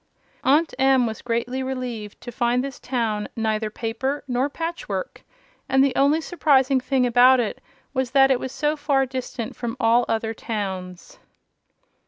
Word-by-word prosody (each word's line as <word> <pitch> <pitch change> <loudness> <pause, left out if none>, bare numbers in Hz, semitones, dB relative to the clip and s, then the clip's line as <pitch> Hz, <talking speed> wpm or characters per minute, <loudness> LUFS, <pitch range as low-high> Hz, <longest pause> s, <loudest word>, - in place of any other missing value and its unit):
Aunt 300 +5 +3
Em 265 -2 +4
was 220 -2 -4
greatly 245 +2 -2
relieved 250 -5 -5
to 240 - -7
find 240 +1 +1
this 275 -1 -6
town 225 -5 -2
"neither 220 -1 -1
paper 240 +6 -3
nor 255 +2 0
patch 330 +3 -5
work," - - -4 0.5
and 265 0 +4
the 275 -2 +1
only 285 +3 +3
surprising 275 -5 +2
thing 255 0 +1
about 250 +2 +6
it 230 -3 -2 0.3
was 260 -2 -1
that 270 +1 +5
it 255 - +2
was 260 - -5
so 300 +2 0
far 280 -2 +1
distant 255 -3 -5
from 235 -2 -5
all 235 +2 +3
other 225 0 -1
towns. 190 -5 -6
255 Hz, 160 wpm, -23 LUFS, 230-270 Hz, 0.5 s, about